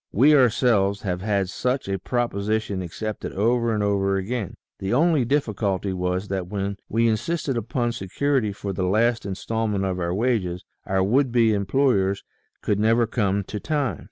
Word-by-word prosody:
We 140 Hz, +9 st, +5 dB
ourselves 115 Hz, -6 st, +3 dB
have 90 Hz, -3 st, -2 dB
had 100 Hz, -2 st, 0 dB
such 125 Hz, +6 st, -2 dB
a 95 Hz, -1 st, -2 dB
proposition 110 Hz, -3 st, -1 dB
accepted 105 Hz, +5 st, -5 dB
over 115 Hz, +3 st, +1 dB
and 105 Hz, -2 st, 0 dB
over 100 Hz, -1 st, +1 dB
again; 105 Hz, +1 st, -3 dB, 0.2 s
the 95 Hz, +5 st, -1 dB
only 155 Hz, -3 st, +3 dB
difficulty 105 Hz, -8 st, 0 dB
was 90 Hz, +2 st, -2 dB
that 95 Hz, -2 st, -2 dB
when 100 Hz, 0 st, -3 dB
we 115 Hz, +2 st, +2 dB
in 110 Hz, -1 st, +2 dB
sisted 165 Hz, -2 st, -2 dB
upon 120 Hz, +1 st, -1 dB
security 120 Hz, +2 st, -1 dB
for 100 Hz, 0 st, -5 dB
the 90 Hz, 0 st, -1 dB
last 110 Hz, +2 st, +1 dB
instalment 105 Hz, +1 st, -2 dB
of 95 Hz, -1 st, -2 dB
our 85 Hz, -1 st, -1 dB
wages, 100 Hz, -6 st, -1 dB, 0.2 s
our 95 Hz, 0 st, +1 dB
would 125 Hz, +6 st, +2 dB
be 115 Hz, -2 st, +4 dB
employers 100 Hz, -1 st, +1 dB, 0.4 s
could 105 Hz, -, +1 dB
never 115 Hz, +2 st, +3 dB
come 100 Hz, -3 st, 0 dB
to 105 Hz, +2 st, -6 dB
time. 140 Hz, -, -1 dB
105 Hz, 165 wpm, -24 LUFS, 95-120 Hz, 0.4 s, We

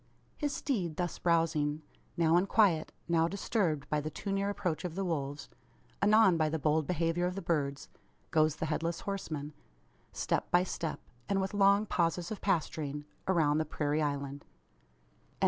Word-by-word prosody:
His 290 Hz, -1 st, -1 dB
steed 190 Hz, -, -2 dB
thus 175 Hz, -1 st, -2 dB
browsing, 160 Hz, -3 st, +1 dB, 0.3 s
now 165 Hz, -1 st, +4 dB
in 180 Hz, +3 st, +3 dB
quiet, 190 Hz, -7 st, +3 dB, 0.2 s
now 165 Hz, -1 st, +3 dB
disturbed 175 Hz, -, -1 dB
by 150 Hz, 0 st, 0 dB
the 155 Hz, -, -3 dB
too 195 Hz, +6 st, -5 dB
near 195 Hz, 0 st, 0 dB
approach 190 Hz, -5 st, -2 dB
of 175 Hz, -3 st, -4 dB
the 195 Hz, 0 st, -1 dB
wolves 145 Hz, -4 st, -3 dB, 0.5 s
anon 210 Hz, -4 st, +5 dB
by 155 Hz, -1 st, +2 dB
the 160 Hz, -, -1 dB
bold 155 Hz, 0 st, +1 dB
behaviour 175 Hz, 0 st, +1 dB
of 180 Hz, -, -4 dB
the 195 Hz, -, -4 dB
birds 145 Hz, -5 st, -1 dB, 0.4 s
goes 155 Hz, -1 st, +3 dB
the 160 Hz, -, -3 dB
Headless 165 Hz, +2 st, -2 dB
Horseman, 155 Hz, -7 st, -4 dB, 0.6 s
step -, -, -1 dB
by 175 Hz, +1 st, +4 dB
step, 165 Hz, -3 st, -3 dB, 0.3 s
and 195 Hz, -, +2 dB
with 190 Hz, +1 st, -2 dB
long 200 Hz, +1 st, +4 dB
pauses 175 Hz, -1 st, 0 dB
of 215 Hz, -, -5 dB
pasturing, 150 Hz, -5 st, -1 dB, 0.2 s
around 155 Hz, -5 st, +3 dB
the -, -, +2 dB
prairie 150 Hz, 0 st, -1 dB
island. 140 Hz, -1 st, -2 dB
165 Hz, 165 wpm, -32 LUFS, 150-190 Hz, 0.6 s, anon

